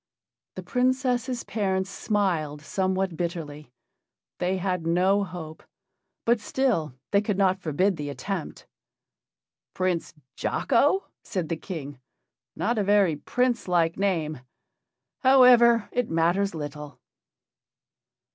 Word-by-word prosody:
The - - -6
Princess' 255 -1 0
parents 190 -3 -1
smiled 170 -10 -1
somewhat 190 +1 -1
bitterly. 155 -5 -5 0.7
They 185 +1 0
had 180 -3 -2
no 185 +4 +3
hope, 165 -4 -8 0.6
but 235 0 +3
still 210 - -1 0.2
they 200 -1 +4
could 210 -2 -2
not 190 -1 +2
forbid 180 +3 0
the 145 -1 -4
attempt. 180 +4 -5 1.1
"Prince 185 -2 -1 0.2
Jocko?" 290 +9 +1 0.2
said 180 -6 -4
the 165 - 0
King, 145 -6 -7 0.6
"not 230 +1 0
a - - +2
very 200 -5 +3
prince 245 - -1
like 170 -2 +2
name. 165 -7 -1 0.8
However, 245 -4 +6
it 245 -2 -1
matters 170 +4 +1
little." 150 -1 -7
190 Hz, 110 wpm, -26 LUFS, 165-215 Hz, 1.1 s, However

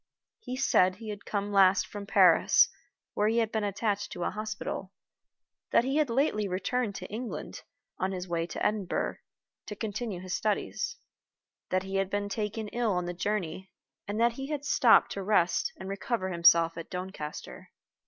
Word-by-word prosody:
He 255 - -6
said 185 -8 +3
he 220 +2 -9
had 205 -1 -7
come 205 0 -2
last 195 -1 +5
from 205 -1 -8
Paris, - - +6 0.4
where 210 - +1
he 225 +2 +1
had 225 -2 +1
been 220 -1 -1
attached 205 0 -1
to 175 - -4
a - - 0
hospital; 215 -3 -5 0.8
that - - +4
he 270 +3 0
had 305 -4 +2
lately 230 -4 +1
returned 200 +4 -1
to - - -6
England, 230 +3 -6 0.4
on 190 +1 0
his 185 -1 -5
way 170 -1 -1
to - - -3
Edinburgh, 210 -4 -1 0.5
to 210 - -5
continue 215 -2 -4
his 185 0 -6
studies; 475 - -1 0.7
that 185 0 +1
he 195 0 -3
had 195 -1 0
been 205 0 -2
taken 215 +1 -3
ill 235 -3 0
on 180 -1 -1
the 175 - -3
journey; 190 -1 -3 0.4
and 205 +2 -3
that 235 0 +4
he 270 +3 -6
had 290 -1 -4
stopped 240 -5 +5
to 200 - -4
rest 190 -3 +2
and 190 - -8
recover 195 +1 -2
himself 170 -1 +5
at 165 - -8
Doncaster. 180 -5 -7
205 Hz, 175 wpm, -29 LUFS, 185-225 Hz, 0.8 s, Paris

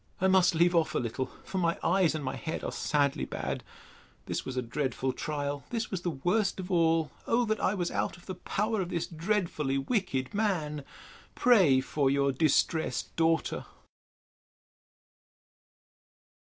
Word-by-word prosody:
I 190 - +3
must 185 -1 +4
leave 175 +2 +4
off 165 -2 +2
a - - +3
little; 125 +2 -2 0.2
for 190 - -3
my 170 -1 +1
eyes 175 -1 +3
and 150 -3 -4
my 130 - -2
head 160 - -4
are - - -2
sadly 145 -2 +1
bad.—This - - -6
was 130 -1 -5
a 125 - 0
dreadful 130 +1 -2
trial! 145 -2 -3
This 230 -2 -3
was 190 -3 -2
the 175 - -1
worst 180 +7 0
of 185 +1 -5
all! 165 -2 +3 0.2
Oh, 240 +1 +3
that 215 -1 0
I 195 - +1
was 175 -3 -1
out - - -1
of 175 - -18
the 185 - -4
power 210 +3 -1
of 175 - -3
this 170 -2 -1
dreadfully 165 -5 -1
wicked 135 - -1
man! 170 -9 -1 0.5
Pray 185 - +5
for 140 0 0
Your 140 0 +2
distressed 155 +3 +1
DAUGHTER. 165 0 +1
165 Hz, 155 wpm, -29 LUFS, 140-190 Hz, 0.5 s, Pray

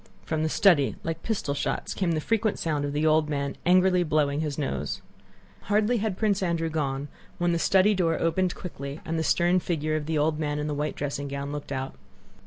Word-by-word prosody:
From 160 -1 -1
the 155 - +1
study, 155 -7 +4
like 165 0 -3
pistol 205 -10 -2
shots, 140 - -2
came 180 -4 0
the 155 - 0
frequent 220 +3 0
sound 150 -3 -1
of 145 - -2
the 150 +2 0
old 155 -1 +3
man 140 -1 -2
angrily 180 0 +5
blowing 150 -3 +1
his 150 -3 -2
nose. 145 -3 -2 0.7
Hardly 210 +4 +2
had 210 -3 -2
Prince 205 -3 +1
Andrew 170 -3 0
gone 140 -2 -2 0.3
when 175 0 +1
the 170 - +1
study 195 +4 +4
door 170 -4 +1
opened 175 +2 +1
quickly 140 -4 -7
and 165 0 -1
the - - 0
stern 175 +3 +3
figure 155 -3 -1
of 155 -1 -3
the 160 -1 0
old 150 +1 +1
man 150 -1 -1
in 150 - -2
the 150 - -2
white 150 +1 -2
dressing 140 0 -3
gown 140 0 -4
looked 145 -1 -6
out. 135 0 -3
160 Hz, 210 wpm, -26 LUFS, 145-180 Hz, 0.7 s, angrily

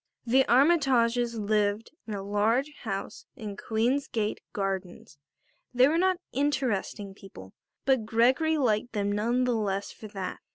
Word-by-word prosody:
The 260 +3 +4
Armytages 245 -4 +3
lived 210 0 0 0.2
in 215 - -4
a 195 - -5
large 225 +8 +1
house 195 -3 -5
in 210 -2 -7
Queen's 235 +7 0
Gate 215 -2 -2
Gardens. 190 -6 -4 0.6
They 250 +2 +6
were 320 +3 +2
not 370 0 +2
interesting 250 -8 -1
people, 185 - -13 0.3
but 260 -5 +2
Gregory 255 +8 +3
liked 235 -4 0
them 205 -1 0
none 235 +5 +1
the 250 -1 +1
less 200 -3 -2
for 215 - -10
that. 195 -3 -5
225 Hz, 140 wpm, -28 LUFS, 205-255 Hz, 0.6 s, They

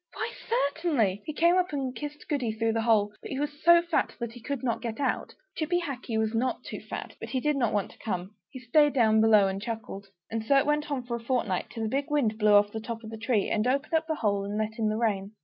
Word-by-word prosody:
Why, 445 +1 -3 0.2
certainly!" 285 - +1
He 310 - -3
came 340 +4 +4
up 365 0 0
and 265 -3 -3
kissed 295 0 -7
Goody 255 -7 -1
through 225 0 0
the 225 - 0
hole; 215 -2 +3
but - - -8
he 270 - -3
was 290 0 -4
so 340 0 +7
fat 340 -2 0
that 235 -1 -3
he 240 0 -12
could 275 +2 -4
not 235 -3 -1
get 230 0 -4
out. 270 -3 -1 0.2
Chippy 340 +3 0
Hackee 260 -8 -4
was 220 0 0
not 250 +3 -1
too - - -6
fat, - - -7
but - - -7
he 260 - 0
did 300 +3 +1
not 240 -5 +1
want 205 -2 -1
to - - -19
come; 185 -3 -3 0.2
he - - -9
stayed 290 +5 +3
down 220 -4 +4
below 215 -3 +6
and 195 +1 -3
chuckled. 215 -3 -6 0.2
And 225 -1 -2
so 275 +5 +4
it 275 - +3
went 295 +1 0
on 275 -3 -2
for 240 -1 -3
a 230 - -12
fortnight; 230 -7 -1
till 225 -2 -4
a - - 0
big 275 +6 -1
wind 235 -7 +1
blew 210 -1 +4
off 205 0 +5
the 220 - -4
top 225 +1 -6
of 220 - -8
the - - -5
tree, 225 -2 +1
and 215 +3 +1
opened 275 +5 0
up 320 0 +2
the 315 - 0
hole 205 -5 0
and 205 +1 -3
let 215 +1 -2
in 215 -1 +2
the 215 - -1
rain. 205 -3 -1
235 Hz, 270 wpm, -28 LUFS, 215-290 Hz, 0.2 s, so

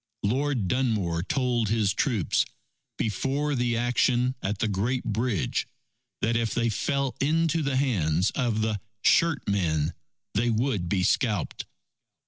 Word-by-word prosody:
Lord 125 0 0
Dunmore 105 -9 0
told 120 +1 0
his 105 -3 +2
troops, 105 - +1 0.5
before 135 +8 -1
the 120 -3 0
action 120 +1 +2
at 100 +2 -2
the 110 - 0
Great 110 +6 -1
Bridge, 110 -3 -1 0.5
that 115 +1 +1
if 115 -1 0
they 115 -1 +1
fell 140 +3 -1
into 160 +3 +2
the 140 -2 -1
hands 95 - +1
of 120 -4 0
the 110 -3 -1 0.2
"shirt 165 -4 +3
men," 80 -6 +1 0.4
they 115 +4 +1
would 110 -6 0
be 95 -1 +1
scalped. 105 -2 0
115 Hz, 130 wpm, -27 LUFS, 100-130 Hz, 0.5 s, shirt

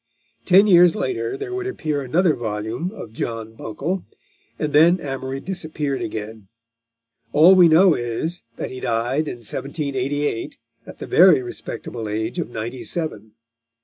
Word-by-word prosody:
Ten 195 +2 +6
years 175 -3 +6
later 395 - -2
there 400 -2 -6
would 380 0 -3
appear 155 - -2
another 160 +6 +2
volume 110 +7 -3
of 115 - -10
John 115 -1 -5
Buncle, 150 - -4 0.5
and 150 -1 -3
then 170 +5 +5
Amory 135 -2 -4
disappeared 155 -6 -3
again. 110 -1 -6 0.9
All 160 +6 +7
we 180 -2 +7
know 170 +3 +6
is, 120 +9 -3
that - - -5
he 130 - -7
died 125 +5 -1
in - - -4
1788, 140 -1 -3 0.3
at - - -10
the - - -7
very 170 -7 +5
respectable 115 -2 -6
age 110 +2 -3
of - - -3
ninety 120 +2 -5
seven. 110 -11 -4
145 Hz, 145 wpm, -21 LUFS, 115-175 Hz, 0.9 s, All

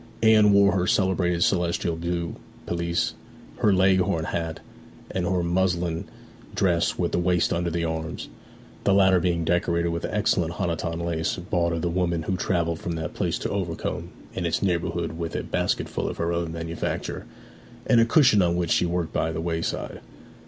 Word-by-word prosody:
Anne 110 -2 +6
wore 100 0 +5
her 90 -2 0
celebrated 90 -3 +2
celestial 90 -5 +1
blue 85 0 -3 0.3
pelisse, 85 0 -1 0.4
her 105 - +3
Leghorn 95 -3 +3
hat, 80 -2 -3 0.5
and 90 -2 -1
her 90 -1 +1
muslin 85 -1 0 0.5
dress 85 -3 +1
with - - 0
the - - +1
waist 90 -1 +2
under 85 0 0
the 85 0 -1
arms; 80 0 -4 0.6
the 100 - +3
latter 95 -2 +5
being 85 -1 0
decorated 85 0 +1
with 85 0 -3
excellent 90 -5 +1
Honiton 85 -2 -2
lace 80 -1 -1
bought 85 -1 -1
of 85 0 -2
the - - +1
woman 85 -2 0
who 95 - -1
travelled 85 -2 0
from 85 - -4
that 80 -1 -4
place - - -1
to - - -3
Overcombe 90 -5 -3 0.2
and 85 -2 -2
its 85 - -1
neighbourhood 85 -2 -1
with 85 -1 -4
a - - -2
basketful - - -1
of - - -6
her 85 0 -1
own 85 -1 -2
manufacture, 80 0 -4 0.6
and 120 -2 +5
a - - +5
cushion 120 -4 +5
on 85 -1 +2
which 85 -2 -1
she 90 - +3
worked 85 -1 -2
by 80 - 0
the 80 - -4
wayside. 80 0 -3
85 Hz, 175 wpm, -25 LUFS, 85-95 Hz, 0.6 s, Anne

